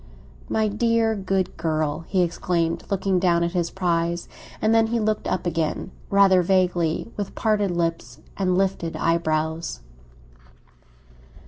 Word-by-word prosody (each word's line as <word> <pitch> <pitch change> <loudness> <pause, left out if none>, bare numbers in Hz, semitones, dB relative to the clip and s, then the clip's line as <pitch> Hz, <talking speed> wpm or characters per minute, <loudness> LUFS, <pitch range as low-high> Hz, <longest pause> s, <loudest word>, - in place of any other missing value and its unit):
"My 220 -1 +1
dear 225 +1 +1
good 190 -2 -1
girl!" 155 -1 -1
he 185 -2 +2
exclaimed, 170 -1 -1
looking 195 -1 +1
down 170 -2 +2
at 170 - 0
his 175 -2 -1
prize. 170 -2 -1 0.3
And 215 +1 +2
then 225 0 +4
he 235 +1 0
looked 215 -1 -1
up - - -1
again, 165 +1 -2 0.2
rather 195 -2 +5
vaguely, 180 0 +1
with 205 -2 -4
parted 210 -2 +1
lips 165 -8 -2 0.2
and 185 -2 +1
lifted 190 -4 -1
eyebrows. 160 - -1
180 Hz, 130 wpm, -24 LUFS, 165-200 Hz, 0.3 s, rather